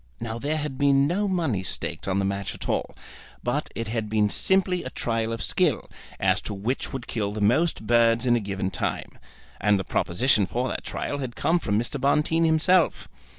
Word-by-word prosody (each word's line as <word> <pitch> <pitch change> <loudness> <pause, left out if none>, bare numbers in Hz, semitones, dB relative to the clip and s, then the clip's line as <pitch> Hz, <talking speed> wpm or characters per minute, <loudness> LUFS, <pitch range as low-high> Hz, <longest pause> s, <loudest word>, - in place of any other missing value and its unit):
Now 115 0 -4
there 150 +5 -1
had 150 -3 -4
been 140 -1 +4
no 190 +7 0
money 160 - 0
staked 95 - -4
on 95 0 0
the 100 - +1
match 100 0 -3
at - - -7
all, - - -2 0.5
but - - -1
it 115 - -3
had 110 -1 -2
been 105 -1 +2
simply 190 -2 +2
a - - -5
trial 115 -2 -2
of 115 - -3
skill, - - +1 0.3
as - - +2
to 105 - -5
which 115 +7 -2
would 130 -3 -5
kill 105 -3 -2
the 105 - -4
most 120 +6 +2
birds 115 +1 +3
in 120 -1 +4
a - - +2
given 95 -2 -3
time. 85 - -3 0.4
And 105 0 +3
the - - -2
proposition 105 +3 +1
for 125 +4 -1
that - - -4
trial 145 - -3
had 130 -3 -5
come 175 +2 +2
from 105 -9 0
Mr. 120 +5 -2
Bonteen 150 +4 +2
himself. 165 +2 +3
120 Hz, 200 wpm, -25 LUFS, 105-150 Hz, 0.5 s, been